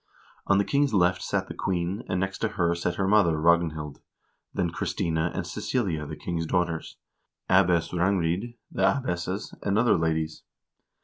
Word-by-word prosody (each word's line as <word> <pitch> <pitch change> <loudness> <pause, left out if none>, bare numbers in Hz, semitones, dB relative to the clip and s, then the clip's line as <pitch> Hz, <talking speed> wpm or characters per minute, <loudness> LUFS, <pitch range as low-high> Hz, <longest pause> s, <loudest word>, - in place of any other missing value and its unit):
On 100 - +4
the 100 - +2
king's 140 -4 +2
left 90 0 +3
sat - - -1
the - - -6
queen, 90 +2 -2
and 95 - 0
next 95 +1 -2
to - - +1
her 85 -1 0
sat 85 0 -2
her 95 +1 0
mother, 95 -6 +4
Ragnhild, 80 -3 +1 0.5
then 90 -4 -1
Christina 80 0 -1
and - - -2
Cecilia, 85 - -2
the - - -6
king's 85 -2 -3
daughters, 85 -2 -1 0.5
Abbess 90 -3 +3
Rangrid, 90 +4 0 0.2
the - - -3
abbesses, 95 -3 0
and 100 0 0
other 120 +2 +4
ladies. 80 -1 -1
90 Hz, 160 wpm, -27 LUFS, 85-100 Hz, 0.5 s, On